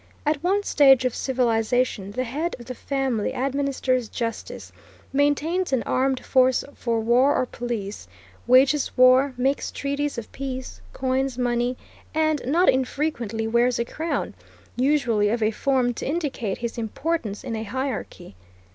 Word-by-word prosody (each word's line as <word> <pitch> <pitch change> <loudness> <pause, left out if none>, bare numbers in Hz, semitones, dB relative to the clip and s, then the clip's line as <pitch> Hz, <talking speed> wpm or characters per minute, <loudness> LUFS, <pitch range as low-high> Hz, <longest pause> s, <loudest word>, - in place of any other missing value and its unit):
At 300 0 0
one 395 +3 +2
stage 270 -7 +5
of 250 - +1
civilization 240 -4 0
the 255 - -1
head 295 +8 -3
of 240 - -12
the 255 - -6
family 260 -2 -2
administers 265 -2 -1
justice, 230 -2 -5 0.4
maintains 290 +5 +1
an 260 -3 +1
armed 260 0 0
force 255 -1 +3
for 230 -2 -1
war 245 +5 +3
or - - +1
police, 230 -5 -5 0.4
wages 265 +4 +4
war, 255 +1 +5
makes 270 +3 0
treaties 280 0 -2
of 230 - -6
peace, 260 - -6
coins 260 - -1
money, 245 0 0 0.4
and, 310 -2 +1
not 340 +7 +3
infrequently, 255 -4 0
wears 235 +2 +2
a 235 - -1
crown, 320 +7 -3 0.4
usually 245 -6 +2
of 230 +1 0
a 215 - +2
form 255 +1 +1
to - - -5
indicate 275 - -2
his 235 0 -4
importance 230 -1 -3
in 245 -4 -4
a 220 - -3
hierarchy. 225 - -5
255 Hz, 145 wpm, -24 LUFS, 235-280 Hz, 0.4 s, stage